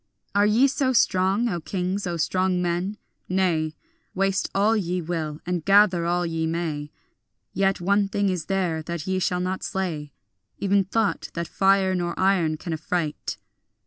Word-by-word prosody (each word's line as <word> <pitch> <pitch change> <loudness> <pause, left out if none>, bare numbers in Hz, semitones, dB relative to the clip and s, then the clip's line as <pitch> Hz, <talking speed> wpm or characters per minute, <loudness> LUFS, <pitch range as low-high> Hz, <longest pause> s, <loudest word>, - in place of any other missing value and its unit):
Are 205 +1 +4
ye 225 +6 +4
so 275 -1 0
strong, 200 -1 +3
O 175 -6 -1
kings, 185 +3 -2
O 170 -1 -2
strong 185 +2 +1
men? 180 +4 -1 0.3
Nay, 170 -4 +1 0.4
Waste 195 0 +1
all 210 +3 +3
ye 180 -3 -1
will 160 -3 -3
and 175 -2 -2
gather 195 -3 +4
all 175 +1 +1
ye 165 -1 -1
may, 160 -3 -3 0.6
Yet 195 0 +1
one 200 +3 +2
thing 200 0 0
is 180 -4 -1
there 180 -5 -1
that 170 -1 -5
ye 190 0 0
shall 180 0 0
not 185 +1 -2
slay, 160 -6 -3 0.5
Even 200 0 +2
thought, 215 +2 -1
that 170 -1 -2
fire 195 -1 +3
nor 175 -2 -2
iron 180 -5 +2
can 170 +1 -5
affright. 160 -1 -3
185 Hz, 160 wpm, -24 LUFS, 170-195 Hz, 0.6 s, Are